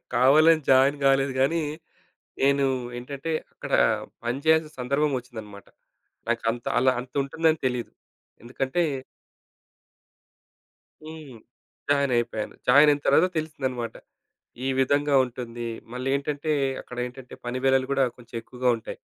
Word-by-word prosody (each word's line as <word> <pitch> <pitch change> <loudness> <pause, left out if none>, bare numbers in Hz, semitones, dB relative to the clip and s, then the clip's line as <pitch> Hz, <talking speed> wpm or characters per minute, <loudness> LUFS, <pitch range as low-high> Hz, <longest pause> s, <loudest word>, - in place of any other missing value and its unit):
కావాలని 155 +6 +5
జాయిన్ 135 +2 +5
గాలేదు 135 0 +3
కానీ, 160 +5 +2 0.8
నేను 140 0 +3 0.3
ఏంటంటే 140 +5 -6 0.2
అక్కడ - - -8 0.5
పని 120 +3 -1
చేయాల్సిన 160 -1 +3
సందర్భం 140 +4 +1
ఒచ్చిందన్నమాట. 110 -5 -11 0.6
నాకు 120 0 0
అంత 120 0 -9
అలా 130 +1 +4
అంత 125 +1 -11
ఉంటుందని 160 +3 +1
తెలియదు. 125 -2 -2 0.5
ఎందుకంటే 130 +7 -1 2.2
హ్మ్. 155 -5 -10 0.5
జాయినయిపోయాను. 120 -6 0
జాయినయిన 145 +3 +6
తర్వాత 180 - +5
తెలిసిందనమాట. 130 -7 -3 0.7
ఈ - - 0
విధంగా 145 +2 +2
ఉంటుంది. 120 -1 -6 0.3
మళ్ళీ 130 +1 -3
ఏంటంటే, 145 +2 -2 0.3
అక్కడ 125 - -11
ఏంటంటే 125 0 -10
పని 120 +1 -3
వేళలు 135 -1 +3
కూడా 135 -1 +3
కొంచెం 120 -1 -14
ఎక్కువగా 125 +2 -2
ఉంటాయి. 110 - -8
135 Hz, 115 wpm, -25 LUFS, 125-145 Hz, 2.2 s, జాయినయిన